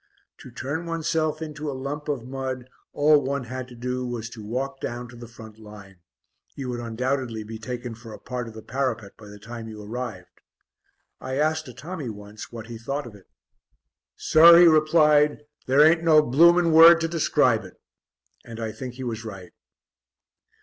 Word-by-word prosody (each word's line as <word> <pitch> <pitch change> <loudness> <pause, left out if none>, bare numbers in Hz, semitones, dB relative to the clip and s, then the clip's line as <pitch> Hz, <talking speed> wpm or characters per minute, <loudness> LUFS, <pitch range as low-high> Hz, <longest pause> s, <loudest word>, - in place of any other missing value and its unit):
To - - -12
turn 145 +7 -5
oneself 160 -1 -1
into 150 -1 -6
a 135 - -5
lump 145 +3 -5
of 140 -6 -3
mud, 130 -1 -5 0.2
all 150 0 +4
one 140 0 -3
had 130 +1 -6
to 125 - -13
do 125 +1 -4
was 120 -2 -5
to 110 -3 -10
walk 135 +5 -4
down 120 +1 -5
to 120 - -13
the 120 0 -10
front 110 -1 -13
line; 105 -3 -13 0.6
you 135 -2 -5
would 120 -1 -4
undoubtedly 120 0 -3
be 110 +1 -9
taken 120 +1 -6
for 115 0 -12
a - - -9
part 125 -1 -6
of 110 - -11
the 110 - -10
parapet 115 -7 -3
by 105 - -14
the 105 0 -12
time 115 +2 -9
you 110 -1 -9
arrived. 110 -3 -7 0.8
I 130 0 -5
asked 155 +2 0
a 125 - -10
Tommy 155 -1 -6
once 105 0 -10
what 115 -2 -8
he 115 -1 -9
thought 140 +5 -4
of 120 - -10
it. 100 -2 -17 0.9
"Sir," 170 +2 +7
he 175 - +8
replied, 150 -2 +4 0.2
"there 140 +3 +6
ain't 165 +1 +4
no 155 -2 +5
blooming 170 +5 +4
word 165 +1 +9
to 165 - 0
describe 145 -8 +1
it!" 90 - -14 0.6
And 115 -1 -10
I 110 -1 -3
think 125 +3 -8
he 130 - -7
was 115 -2 -4
right. 95 -5 -9
125 Hz, 185 wpm, -24 LUFS, 115-150 Hz, 0.9 s, word